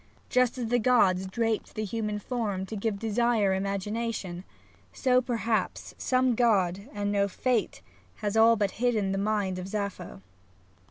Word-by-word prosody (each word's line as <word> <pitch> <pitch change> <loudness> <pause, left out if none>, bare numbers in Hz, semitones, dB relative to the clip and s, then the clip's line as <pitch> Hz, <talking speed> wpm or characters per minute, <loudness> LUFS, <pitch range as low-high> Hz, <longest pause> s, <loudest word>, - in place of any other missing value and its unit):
Just 250 0 +2
as 240 -3 -3
the 245 +1 +3
gods 195 -6 +3
draped 225 +2 -2
the 215 - -2
human 210 0 -2
form 210 -4 -3
to 220 - -6
give 210 0 -2
desire 225 -2 +1
imagination, 195 -1 -3 0.5
so, 255 -2 +2
perhaps, 230 -3 -2
some 255 -1 +1
god 205 -3 +1
and 205 -1 -2
no 200 -1 +2
fate 240 +3 -1 0.3
has 205 0 -3
all 225 +1 +6
but 205 -3 0
hidden 220 -6 +1
the 195 - -1
mind 200 -3 0
of 180 - -6
Sappho. 195 - -5
215 Hz, 150 wpm, -28 LUFS, 195-235 Hz, 0.5 s, all